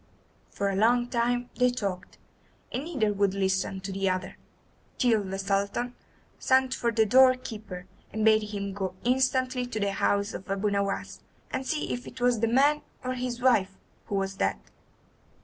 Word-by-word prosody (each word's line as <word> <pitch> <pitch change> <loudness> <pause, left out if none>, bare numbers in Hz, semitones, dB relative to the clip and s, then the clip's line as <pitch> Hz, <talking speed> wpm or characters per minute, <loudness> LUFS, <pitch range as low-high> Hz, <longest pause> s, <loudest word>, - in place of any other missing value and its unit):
For 200 0 -1
a - - -2
long 240 +4 +3
time 245 0 0
they 250 0 +4
talked, 200 -6 -4 0.5
and 270 - -3
neither 240 -11 0
would 200 -1 +1
listen 190 0 0
to 195 +1 -5
the 195 0 0
other, 185 0 -3 0.6
till 230 -5 +3
the 190 0 -4
Sultan 200 +5 -1 0.5
sent 260 0 +3
for 235 - 0
the 220 -1 +3
door 255 +4 +6
keeper 210 -7 -8 0.3
and 220 0 -1
bade 215 -1 +4
him 200 -1 -4
go 190 -2 -3
instantly 255 0 +1
to 220 - -4
the 200 -1 0
house 200 +1 0
of 185 - -8
Abu 200 +1 0
Nowas 200 0 -2 0.3
and 260 0 -3
see 300 +4 -1
if 245 +1 -6
it 255 - -10
was 245 -2 +2
the 230 - +2
man 280 +6 +4 0.2
or 255 0 -2
his 250 -1 -4
wife 195 -7 +3 0.3
who 205 - -2
was 195 0 -1
dead. - - 0
220 Hz, 175 wpm, -28 LUFS, 195-250 Hz, 0.6 s, door